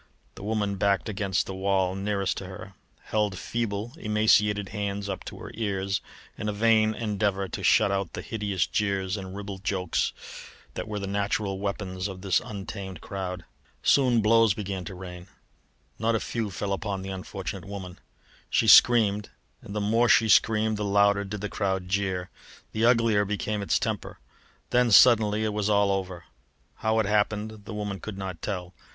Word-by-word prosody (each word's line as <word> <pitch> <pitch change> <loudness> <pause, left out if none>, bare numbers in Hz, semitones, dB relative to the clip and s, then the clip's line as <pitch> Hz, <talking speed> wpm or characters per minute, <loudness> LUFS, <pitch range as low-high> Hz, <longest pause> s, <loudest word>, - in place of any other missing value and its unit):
The - - -12
woman 105 -1 -1
backed 100 +2 +1
against 100 -3 0
the 95 - -6
wall 95 -1 +1
nearest 100 0 -1
to 95 - -6
her, 95 +1 -9 0.3
held 105 -3 -1
feeble, 115 +3 -3
emaciated 105 - +2
hands 100 -1 -3
up 100 - -4
to - - -8
her - - -9
ears 100 -3 -1 0.4
in 105 -1 -2
a - - -1
vain 110 0 +3
endeavour 100 -3 -1
to - - -5
shut 100 - +4
out 100 -2 -2
the - - -5
hideous 100 -5 -1
jeers 100 -2 -1
and 95 -2 -7
ribald 100 -1 -7
jokes 95 -3 0 0.6
which - - -5
were 105 -1 -4
the 100 - -3
natural 100 0 -1
weapons 100 -2 -3
of 95 -2 -8
this 95 -2 +2
untamed 95 -3 -7
crowd. 90 -2 -5 0.4
Soon 125 -4 +4
blows 115 -1 +4
began 95 -3 -4
to 100 - -7
rain; 90 -1 -9 0.7
not 115 +1 +1
a - - +1
few 115 -1 -3
fell 100 +1 -3
upon 100 -1 -3
the 95 - -6
unfortunate 95 0 -6
woman. 95 -3 -8 0.5
She - - +2
screamed, 105 -4 +6 0.3
and 100 - -9
the - - 0
more 115 +3 +2
she 110 -2 +5
screamed 110 0 +4
the 105 - -2
louder 100 0 +3
did 100 +1 -6
the 105 - -2
crowd 95 -3 -2
jeer, 95 -2 -1 0.4
the 110 +1 +1
uglier 115 -4 +4
became 105 +1 -2
its 100 - +1
temper. - - -3 0.5
Then 125 -1 +4
suddenly 110 -1 +6
it 110 -1 -1
was 105 0 0
all 100 -1 +3
over. 95 -3 -3 0.5
How 110 0 0
it 110 - +2
happened 105 0 -1
the 110 - -7
woman 105 -2 -4
could 110 -3 -7
not 95 -3 -6
tell. 90 -3 -4
100 Hz, 175 wpm, -27 LUFS, 95-105 Hz, 0.7 s, screamed